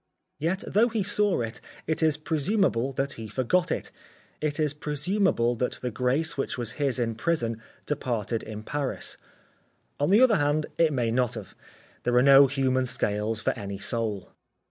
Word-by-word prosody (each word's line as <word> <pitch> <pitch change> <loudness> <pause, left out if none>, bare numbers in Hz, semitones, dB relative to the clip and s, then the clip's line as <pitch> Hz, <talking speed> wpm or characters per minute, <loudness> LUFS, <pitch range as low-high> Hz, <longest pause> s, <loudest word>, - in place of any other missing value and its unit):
Yet 170 +5 -1
though 220 +4 +3
he 220 -3 -1
saw 205 -4 +2
it, 115 +2 -5 0.2
it 160 - -1
is 155 -2 +3
presumable 155 - 0
that 135 +2 -1
he 110 -1 -8
forgot 160 - 0
it. - - -3 0.5
It 150 0 -1
is 150 -2 +1
presumable 150 - +1
that 125 - -1
the 125 - -5
grace 130 +7 0
which 135 - -3
was 120 -3 -2
his 135 -3 +2
in 115 -2 0
prison 115 -3 -1 0.2
departed 120 -6 -2
in 110 -1 -7
Paris. 145 +2 -3 0.8
On 145 - +1
the 205 +5 +6
other 240 -5 +6
hand 145 +1 +1
it 165 -2 +4
may 120 -5 0
not 125 0 +1
have. 105 -4 -8 0.5
There 120 0 0
are 125 - +5
no 140 0 +8
human 130 -1 +1
scales 105 0 -1
for - - +1
any 100 -4 -6
soul. 110 -2 -3
135 Hz, 170 wpm, -27 LUFS, 115-155 Hz, 0.8 s, no